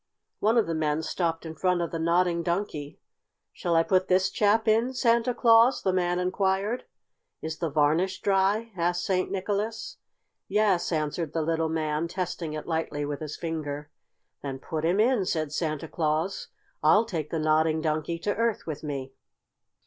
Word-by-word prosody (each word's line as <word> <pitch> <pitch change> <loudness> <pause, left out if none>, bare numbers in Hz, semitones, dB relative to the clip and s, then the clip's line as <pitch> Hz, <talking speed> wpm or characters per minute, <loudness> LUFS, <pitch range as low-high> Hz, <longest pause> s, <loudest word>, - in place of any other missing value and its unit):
One 220 +3 +3
of 230 - +4
the 165 - -2
men 155 0 0
stopped 165 0 -2
in 160 - -5
front 180 +1 +1
of 170 -1 -2
the 165 - -3
Nodding 170 +1 +2
Donkey. 170 -4 -3 0.5
"Shall 170 -1 -1
I 165 - +5
put 185 +1 +2
this 190 +1 +2
chap 220 +2 +2
in, 230 +4 +2
Santa 235 -1 +3
Claus?" 235 +1 +5
the 190 - +1
man 180 -1 +1
inquired. 190 +5 0 0.6
"Is 160 0 -4
the 165 - -1
varnish 155 +6 +1
dry?" 200 +3 +1
asked 175 0 0
St. 185 -1 0
Nicholas. 205 +3 -3 0.5
"Yes," 200 -5 +2
answered 155 0 -2
the 165 - 0
little 160 0 0
man, 155 0 -1
testing 175 -3 -4
it 155 -1 -5
lightly 160 -3 -2
with 145 -1 -4
his 155 -2 -6
finger. 150 -3 -4 0.5
"Then 135 -2 -4
put 155 +3 -5
him 175 +5 +2
in," 230 -1 +3
said 155 -4 -2
Santa 155 -1 -2
Claus. 160 +4 -1 0.3
"I'll 220 +2 +5
take 160 -9 -4
the 165 - -2
Nodding 155 0 +2
Donkey 155 +1 -1
to 205 - 0
Earth 230 -1 0
with 150 -3 -5
me." 135 -3 -5
170 Hz, 170 wpm, -27 LUFS, 155-195 Hz, 0.6 s, I